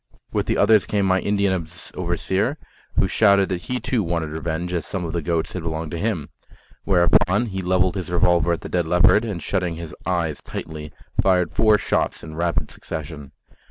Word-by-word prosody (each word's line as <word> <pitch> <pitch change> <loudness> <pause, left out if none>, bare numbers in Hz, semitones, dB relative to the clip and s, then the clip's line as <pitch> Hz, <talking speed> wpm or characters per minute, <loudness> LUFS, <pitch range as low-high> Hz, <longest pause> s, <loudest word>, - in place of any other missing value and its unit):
With - - -1
the - - +1
others 105 0 +4
came 100 -2 +1
my 95 0 +3
Indian 100 -4 0 0.3
overseer, 95 - -1 0.4
who 95 - +4
shouted 100 0 +4
that 90 -2 -2
he 125 +5 -3
too 125 -3 0
wanted 85 -4 -2
revenge, 80 +2 -3
as 85 -3 -1
some 95 -3 -3
of 80 - -5
the 85 - -1
goats 85 0 -1
had 90 - -4
belonged 80 -1 -4
to 85 - -4
him. 100 -8 -2 0.6
Whereupon 100 +3 +3
he 95 -4 -4
levelled 90 0 +2
his 95 -2 -4
revolver 85 -1 +3
at 85 - -1
the - - -6
dead 85 -2 0
leopard, 90 +5 +5
and 100 -8 -4
shutting 90 -4 -1
his 80 -2 -7
eyes 85 -4 -1
tightly, 75 -1 -7 0.3
fired 90 -2 +2
four 110 -1 +4
shots - - -1
in 80 - -8
rapid 85 +1 -1
succession. 75 -3 -7
90 Hz, 190 wpm, -22 LUFS, 85-95 Hz, 0.6 s, leopard